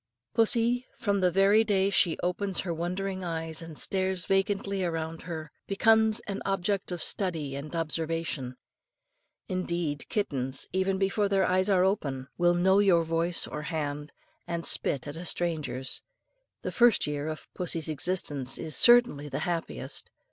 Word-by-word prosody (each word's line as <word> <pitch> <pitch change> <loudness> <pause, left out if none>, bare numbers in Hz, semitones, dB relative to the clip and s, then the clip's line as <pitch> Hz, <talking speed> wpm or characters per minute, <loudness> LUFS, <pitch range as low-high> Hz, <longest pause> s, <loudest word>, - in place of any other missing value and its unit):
Pussy, 235 +2 +2
from 200 -2 0
the 180 - +4
very 195 +4 +4
day 200 -2 +2
she 175 -4 +3
opens 185 +2 -1
her 175 -2 -3
wondering 185 +3 -3
eyes 165 -2 -4
and 165 -2 -9
stares 190 -2 +1
vacantly 195 0 0
around 165 -1 -3
her, 160 -3 -6 0.2
becomes 220 +1 +3
an 200 -1 -5
object 195 0 -1
worthy 180 - 0
of 170 - -2
study 160 -8 -1
and 145 +4 -6
observation. 160 -5 -2 0.9
Indeed, 170 -6 -3
kittens, 135 - -2
even 190 +1 +1
before 200 +1 +1
their 195 -1 +3
eyes 185 +2 +2
are 185 -2 +4
opened, 140 -9 -1
will 175 0 +3
know 190 +3 +4
your 185 -5 +4
voice 165 +1 0
or 150 - -5
hand, 150 -2 -4 0.4
and 170 -1 -3
spit 140 0 +2
at 145 - -6
a 165 - -6
stranger's. 155 -7 -1 0.6
The - - -3
first 240 -2 +4
year 150 0 -3
of 155 0 -6
pussy's 165 -3 -2
existence 150 -4 -1
is 160 -2 -3
certainly 240 -12 +5
the - - -3
happiest. 165 -6 -3
175 Hz, 155 wpm, -28 LUFS, 155-195 Hz, 0.9 s, certainly